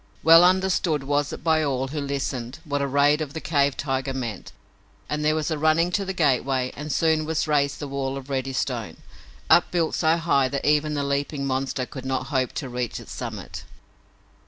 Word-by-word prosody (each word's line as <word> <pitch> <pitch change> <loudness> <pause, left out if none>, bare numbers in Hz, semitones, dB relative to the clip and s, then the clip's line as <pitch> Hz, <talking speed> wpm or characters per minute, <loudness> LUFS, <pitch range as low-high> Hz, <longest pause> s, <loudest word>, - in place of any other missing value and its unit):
Well 165 +1 +8
understood 180 -5 +2
was 145 +1 0
it - - -8
by 160 -1 +3
all 135 -3 -1
who 150 +1 -3
listened 135 -3 -3
what 145 -2 -1
a 140 - 0
raid 145 +3 +3
of 145 -2 -4
the 160 - -4
cave 140 -4 +1
tiger 135 -1 -2
meant, 115 -6 -5 0.6
and 150 0 -2
there 155 +1 +2
was 155 +1 -1
a 155 - -1
running 160 +3 +3
to 200 +2 0
the 190 - -2
gateway 135 -6 +1
and 150 +2 -6
soon 160 +1 +2
was 160 0 -1
raised 140 -2 +1
the 145 - -6
wall 135 -1 -3
of 135 -1 -8
ready 135 -1 -2
stone, 130 - -3 0.5
upbuilt 170 -3 +3
so 160 0 +2
high 150 -5 +2
that 140 +1 -3
even 150 0 +2
the 145 - -1
leaping 140 0 -2
monster 130 -1 -1
could 130 0 -9
not 130 0 -2
hope 130 -2 0
to 135 - -4
reach 125 -1 -3
its - - -12
summit. - - -6
145 Hz, 200 wpm, -24 LUFS, 135-155 Hz, 0.6 s, Well